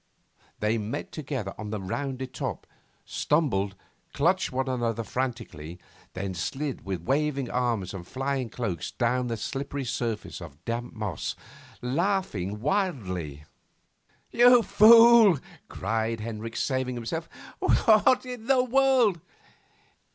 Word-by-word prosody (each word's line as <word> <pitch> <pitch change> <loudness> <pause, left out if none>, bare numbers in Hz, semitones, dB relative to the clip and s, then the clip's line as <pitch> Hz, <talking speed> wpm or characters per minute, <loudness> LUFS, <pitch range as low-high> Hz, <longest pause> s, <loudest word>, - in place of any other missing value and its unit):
They 110 +2 +1
met 105 +2 -5
together 130 -10 -4
on 105 -1 -5
the 105 0 -3
rounded 130 +6 -4
top, - - -4 0.4
stumbled, 100 -11 0 0.4
clutched 180 +5 +1
one 130 +1 -1
another 115 -3 -1
frantically, 115 -11 -4 0.4
then 95 0 -4
slid 135 - -4
with 95 -3 -4
waving 140 - 0
arms 115 -7 -1
and 90 -2 -8
flying 135 -2 -2
cloaks 105 -11 -3
down 125 +1 0
the 115 -1 -2
slippery 135 +3 -4
surface 115 -3 -3
of 75 +5 -12
damp 120 +1 -4
moss 105 -7 -3 0.5
laughing 125 - -1
wildly. 100 - -2 1.2
'Fool!' 225 -1 +8 0.3
cried 115 0 -2
Hendricks, 115 +1 -4
saving 130 -2 -1
himself. 160 +8 -4 0.4
'What 250 +3 +4
in 245 -3 -7
the 265 -2 +4
world 255 - +3
125 Hz, 115 wpm, -27 LUFS, 105-155 Hz, 1.2 s, Fool